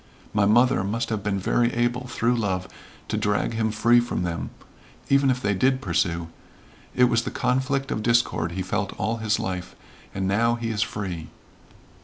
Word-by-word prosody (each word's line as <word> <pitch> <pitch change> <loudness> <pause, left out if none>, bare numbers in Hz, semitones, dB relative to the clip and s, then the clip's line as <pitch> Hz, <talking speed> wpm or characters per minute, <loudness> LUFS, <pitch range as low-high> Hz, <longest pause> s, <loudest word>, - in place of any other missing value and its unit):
My 105 -1 +3
mother 120 -1 +4
must 110 +4 -2
have 110 -2 -2
been 100 0 -1
very 120 +5 +1
able 120 +1 0
through 120 0 +1
love 95 -5 -1 0.4
to - - -2
drag 105 +1 0
him 110 0 0
free 115 +3 +4
from 120 -6 -2
them, 85 -2 -3 0.6
even 140 0 +4
if 125 -1 +1
they 100 - +2
did 130 +7 +2
pursue. 85 -4 -1 0.7
It 125 - +4
was 120 -1 +4
the - - -4
conflict 130 +2 0
of 110 - -1
discord 115 -8 +1
he 95 +1 -2
felt 95 +1 -2
all 110 +4 -1
his 110 -1 0
life, 90 -1 -4 0.4
and 95 0 -1
now 115 +4 +2
he 115 -1 -3
is 110 -1 -2
free." 90 -7 -3
110 Hz, 180 wpm, -24 LUFS, 95-120 Hz, 0.7 s, mother